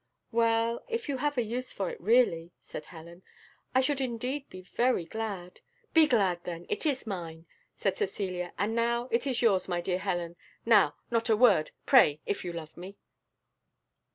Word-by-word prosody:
"Well, 230 0 +1
if 460 -1 -3
you 280 -2 -1
have 290 +1 -1
a 245 - +2
use 245 +3 -4
for 195 -2 -3
it, - - -10
really," 175 -6 +2
said 150 - -9
Helen, 170 +1 -12 0.5
"I 260 - +6
should 275 +1 0
indeed 260 +3 -3
be 185 - -10
very 240 0 0
glad 195 -2 -5 0.2
" 470 -2 -39
"Be 320 -2 +6
glad 190 -9 +2
then, 175 -1 -6
it - - -1
is 270 -4 -1
mine," 170 -5 -6 0.3
said - - -1
Cecilia; 185 - -3
"and 205 +4 0
now 235 +1 0
it 235 +4 +1
is 250 -2 0
yours, 200 -5 +3
my 175 -2 -1
dear 180 +1 -1
Helen, 175 -3 -3 0.3
now, 210 -10 +5 0.2
not 230 0 +1
a 220 - +4
word! 225 -10 +5 0.2
pray, 145 +1 +6
if 200 - -2
you 175 - -4
love 165 -2 -8
me!" 185 +3 -10
220 Hz, 180 wpm, -29 LUFS, 175-245 Hz, 0.5 s, I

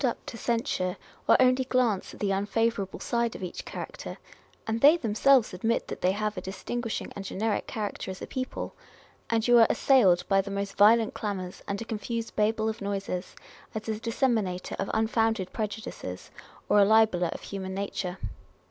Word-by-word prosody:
up 245 -3 -1
to - - -7
censure, 230 -6 -1 0.3
or - - +7
only 255 0 +4
glance 250 -6 +1
at - - -13
the 200 -1 0
unfavourable 205 0 0
side 235 -1 -1
of - - -7
each 180 - -5
character - - -7 0.5
(and 225 +1 -2
they 300 +4 +8
themselves 245 - +3
admit 225 +6 0
that - - -6
they 180 - +3
have 210 +1 -2
a 185 - -4
distinguishing 230 +5 -4
and 200 - -5
generic 205 +2 -2
character 210 -3 -4
as 185 - -6
a - - -5
people), 255 0 -4 0.6
and 225 0 +1
you 240 -1 +7
are 225 - +7
assailed 195 -11 +4
by 195 -1 +4
the 195 - -8
most 200 0 -3
violent 220 +2 +5
clamours, 190 -4 -4
and 200 0 -2
a - - -13
confused 225 +1 -4
Babel 220 +1 +1
of 220 0 -3
noises, 195 -2 -3 0.4
as 220 - -4
a 215 -1 -2
disseminator 225 -6 0
of 195 - -2
unfounded 225 -3 +1
prejudices, 210 - -5 0.4
or 210 - +5
a - - +8
libeller 215 -4 +4
of - - -6
human 190 -1 -5
nature. 195 -2 -3
215 Hz, 175 wpm, -28 LUFS, 195-230 Hz, 0.6 s, they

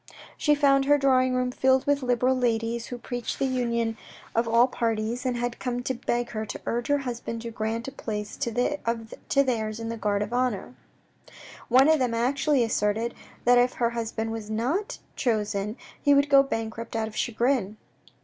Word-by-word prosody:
She 295 -1 +3
found 275 -2 +4
her 290 +1 +5
drawing 255 -2 +3
room 250 0 0
filled 260 +1 +2
with 285 0 +2
Liberal 250 +1 +2
ladies 235 -1 0
who 245 - -6
preached 245 0 -4
the - - 0
union 235 -3 0 0.4
of 230 +1 +1
all 230 +2 +5
parties 230 0 -2
and 245 -1 0
had 240 0 -3
come 245 -1 -3
to 260 - -1
beg 240 0 -2
her 215 -1 -3
to 220 - -6
urge 240 +1 -1
her 285 - +3
husband 240 -3 -5
to 235 - -5
grant 225 +2 -3
a - - -4
place 210 -5 -5
to 235 0 -1
theirs 220 -3 -1
in 225 0 -4
the 230 - -4
guard 205 -2 0
of 210 +3 -6
honour. 245 -3 -1 1.0
One 260 +3 +6
of 315 -1 +4
them 245 -3 0
actually 265 +3 +2
asserted 220 +1 0 0.3
that 245 0 +6
if 245 +1 +3
her 235 -1 0
husband 225 -1 -3
was 225 -2 -6
not 260 - -1 0.2
chosen 210 -2 -1 0.2
he 285 0 +5
would 280 +1 +3
go 275 -1 +8
bankrupt 225 -3 -4
out 220 -1 0
of 215 - -10
chagrin. 235 -3 0
240 Hz, 185 wpm, -26 LUFS, 225-260 Hz, 1.0 s, go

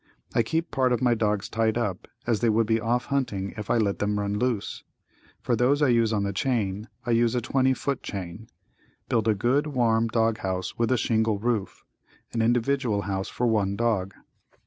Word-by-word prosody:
I - - +3
keep 165 +8 -2
part 130 -3 +2
of 120 - +2
my 120 -1 +4
dogs 105 -3 0
tied 110 0 0
up, 105 -6 -2 0.2
as 115 -3 +1
they 120 - +2
would 110 +1 +3
be 110 +1 +1
off 120 +2 0
hunting 105 -8 -1
if 105 -2 -7
I - - +3
let 100 -3 0
them 105 0 0
run 100 0 -1
loose. 120 -5 -2 0.6
For 120 - +1
those 135 +5 +2
I 140 - +4
use 115 -2 +3
on 105 -2 0
the 100 0 -2
chain 110 -7 -1 0.2
I 120 - -1
use 115 +1 +3
a - - +2
20 130 +2 +1
foot 140 0 -2
chain. 100 +3 -7 0.6
Build 115 -2 +1
a 110 - +3
good, 130 +9 +1
warm 115 -5 +2
dog 115 -1 +1
house 95 -1 -3
with 115 +1 0
a 130 - +3
shingle 110 -2 +1
roof, 110 -2 -2 0.5
an 115 - 0
individual 120 -2 +1
house 95 -1 -2
for 125 - -2
one 105 -4 +1
dog. 100 -4 0
115 Hz, 200 wpm, -26 LUFS, 105-120 Hz, 0.6 s, my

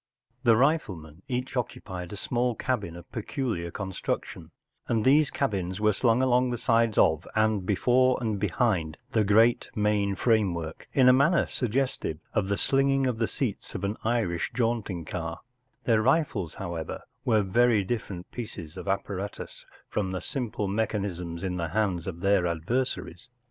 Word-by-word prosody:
The 115 -2 +5
riflemen 95 - 0
each 125 0 -3
occu¬ 125 -2 -3
pied 90 -2 -6
a - - -5
small 120 +3 0
cabin 105 -11 -2
of 85 0 -12
peculiar 110 -6 -3
construction, 95 +1 -4 0.4
and 115 -2 +1
these 145 +2 +5
cabins 95 -8 -2
were 105 0 +3
slung 120 +4 +2
along 125 0 +3
the 120 - -2
sides 115 -2 +2
of 80 0 +3
and 110 -3 +2
before 125 +5 +3
and 110 -4 -1
behind 95 -5 0
the 110 - +3
great 110 +4 +4
main 105 -2 +1
framework, 90 -8 0
in 130 -2 +4
a 125 - +8
manner 145 +7 +4
suggestive 125 - -1 0.2
of 100 -3 +1
the 100 0 0
slinging 135 +2 +2
of 125 -3 -1
the 115 - +2
seats 120 -8 -3
of - - -4
an 100 +2 -1
Irish 110 -7 0
jaunting 115 -8 -1
car, 85 0 -5 0.4
Their 115 -2 +3
rifles, 130 - +1
however, 85 -4 -5 0.2
were 110 -3 +3
very 115 +1 +3
different 95 -4 -4
pieces 95 -9 -7
of 90 - -7
apparatus 100 0 -4 0.2
from 95 -3 -2
the 90 - -3
simple 120 - -3
mechanisms 95 -5 -2
in 90 -1 -2
the 85 -1 -1
hands 90 -2 -1
of 85 -2 -5
their 100 -2 +3
adversaries. 120 +9 -2
105 Hz, 160 wpm, -27 LUFS, 90-120 Hz, 0.4 s, a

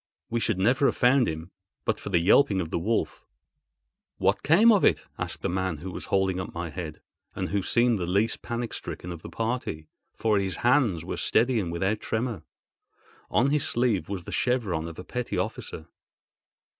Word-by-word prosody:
We 120 - +1
should 105 - 0
never 125 +8 +3
have - - 0
found 125 0 +4
him 80 +3 -5 0.3
but - - 0
for - - -6
the 95 - +3
yelping 95 +3 +4
of 85 -3 -3
the - - 0
wolf." 110 +7 -1 0.9
"What - - +2
became 205 +10 +6
of 205 -4 +4
it?" - - +3
asked - - -4
the - - +1
man 95 -2 -1
who 90 +5 -7
was - - -6
holding 95 -1 +1
up 90 - -5
my 85 -1 -4
head, 80 -1 -7 0.3
and - - -3
who 100 0 0
seemed 120 +2 +2
the 90 - -2
least 100 +5 +1
panic 120 0 -4
stricken 90 - -6
of 85 -2 -7
the - - -9
party, 115 -10 -3 0.3
for 110 -3 +2
his 95 -2 -2
hands 120 - +3
were - - -4
steady 120 -1 +2
and 90 -5 -2
without 95 +5 0
tremor. 115 -5 -2 0.9
On 135 +4 +3
his 150 -1 +1
sleeve 115 -9 +1
was 95 -3 -4
the - - -8
chevron 105 -11 0
of 85 - -9
a 90 - -7
petty 125 +5 -4
officer. 80 - -4
100 Hz, 195 wpm, -27 LUFS, 85-120 Hz, 0.9 s, became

